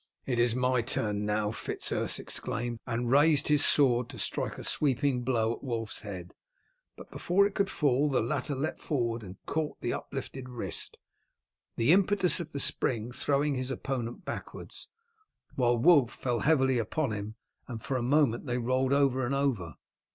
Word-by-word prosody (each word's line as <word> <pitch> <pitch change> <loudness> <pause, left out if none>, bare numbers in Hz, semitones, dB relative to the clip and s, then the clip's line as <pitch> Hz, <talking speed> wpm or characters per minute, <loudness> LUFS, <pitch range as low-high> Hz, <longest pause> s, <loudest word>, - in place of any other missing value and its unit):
"It 125 -3 -1
is 120 -1 +3
my 125 -1 +2
turn 105 -2 -1
now!" 105 0 0
Fitz - - -4
Urse - - 0
exclaimed, 120 -1 -3
and 120 0 -1
raised 145 +1 +4
his 150 -1 +4
sword 125 -4 +3
to - - -9
strike - - -2
a - - -7
sweeping 135 -2 +1
blow 115 -2 +1
at - - -11
Wulf's 115 -5 -3
head, 95 -4 -8 0.6
but - - -12
before 195 +3 +2
it 200 - -1
could 200 -1 0
fall 145 -2 +2
the 135 - +2
latter 140 +4 -2
leapt 140 +4 -3
forward 120 -6 -1
and 95 -2 -10
caught 155 0 -2
the - - -2
uplifted 130 -1 -6
wrist, 120 -2 -4 0.8
the 115 +6 +3
impetus 195 -1 +3
of 165 -2 -6
the 140 - -4
spring 120 -3 0
throwing 145 +3 +1
his 130 -1 -2
opponent 125 -3 -4
backwards, - - -7 0.6
while 120 -2 +2
Wulf 145 -2 +5
fell 120 -2 -2
heavily 135 -3 +3
upon 125 +4 -1
him, 105 +1 -5 0.3
and 115 -3 -7
for 135 - -2
a 130 - 0
moment 135 -1 +2
they 120 0 0
rolled 130 +2 +1
over 135 -2 +2
and 130 +3 0
over. 115 - -1
125 Hz, 175 wpm, -29 LUFS, 115-145 Hz, 0.8 s, Wulf